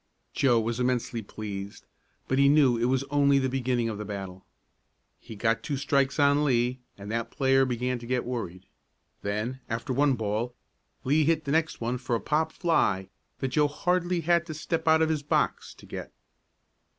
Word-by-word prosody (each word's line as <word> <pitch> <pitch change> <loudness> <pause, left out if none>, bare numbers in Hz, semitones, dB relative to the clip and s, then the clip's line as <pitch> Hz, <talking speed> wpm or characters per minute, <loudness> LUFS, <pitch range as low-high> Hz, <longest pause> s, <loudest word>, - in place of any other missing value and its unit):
Joe 125 -4 +3
was 115 +2 -2
immensely 125 -2 0
pleased, 100 -1 -7 0.4
but 130 - +1
he 140 0 +6
knew 140 -4 +5
it 115 +1 0
was 130 +1 +1
only 140 -1 +4
the 130 -1 +1
beginning 125 -2 0
of 110 -2 -4
the - - -3
battle. 95 -2 -7 0.8
He 110 - -11
got 115 +2 +1
two 145 -3 -3
strikes 140 +1 +1
on 145 +1 +4
Lee 125 -2 +1 0.2
and 100 +1 -8
that 115 0 -2
player 135 0 +3
began 125 0 -2
to 120 - -10
get 125 0 -1
worried. 95 -7 -5 0.6
Then, 110 +6 -3
after 115 +4 -2
one 140 +1 +3
ball, 110 +2 -2 0.5
Lee 150 +3 +3
hit 160 0 +1
the 140 - -2
next 160 -2 0
one 120 +2 -1
for 125 -1 -1
a - - 0
pop 155 +5 0
fly 100 - +1 0.3
that 135 - 0
Joe 150 +3 +3
hardly 175 +3 0
had 170 +1 +2
to 155 - -5
step 160 +1 -3
out 160 0 +5
of 160 - +1
his 155 -2 0
box 145 - 0
to - - -15
get. - - -7
130 Hz, 185 wpm, -27 LUFS, 115-145 Hz, 0.8 s, he